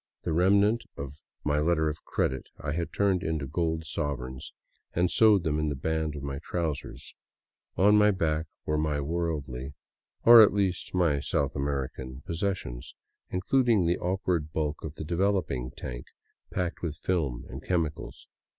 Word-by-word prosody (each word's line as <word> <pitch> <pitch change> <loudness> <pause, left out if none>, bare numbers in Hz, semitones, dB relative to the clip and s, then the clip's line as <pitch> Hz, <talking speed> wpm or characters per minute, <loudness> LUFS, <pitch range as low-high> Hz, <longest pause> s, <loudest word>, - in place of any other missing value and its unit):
The - - -1
remnant 100 +6 +4
of 70 +2 -7 0.2
my 75 0 +1
letter 80 0 +2
of 75 0 -4
credit 65 - -1
I 75 - -3
had 85 +2 -2
turned 95 -3 +2
into 80 -5 -2
gold 80 +3 -1
sovereigns 65 -5 -4 0.4
and 85 0 +2
sewed 105 -5 +5
them 75 -2 0
in 75 0 0
the 70 - -2
band 80 +2 -1
of 70 - -6
my 70 -1 -4
trousers; 80 -2 -4 0.6
on 105 +2 +6
my 105 0 +6
back 80 -5 0 0.2
were 75 0 0
my 75 -1 0
worldly 70 -4 -3 0.2
— - - -40
or 115 0 +11
at 105 - +6
least 95 -3 -1
my 85 -6 +3
South 70 0 -1
American 70 -2 -3
— - - -25
posses 95 +4 0
sions, - - -8 0.3
including 110 +1 +2
the 85 +1 +1
awkward 90 -4 -1
bulk 75 -1 -2
of 80 -1 -6
the 80 - -6
developing 85 -8 0
tank - - -6 0.4
packed 90 -1 -2
with 80 -3 -3
films 80 -11 -1
and 65 +3 -8
chemicals. 85 -4 -2
80 Hz, 165 wpm, -28 LUFS, 70-90 Hz, 0.6 s, or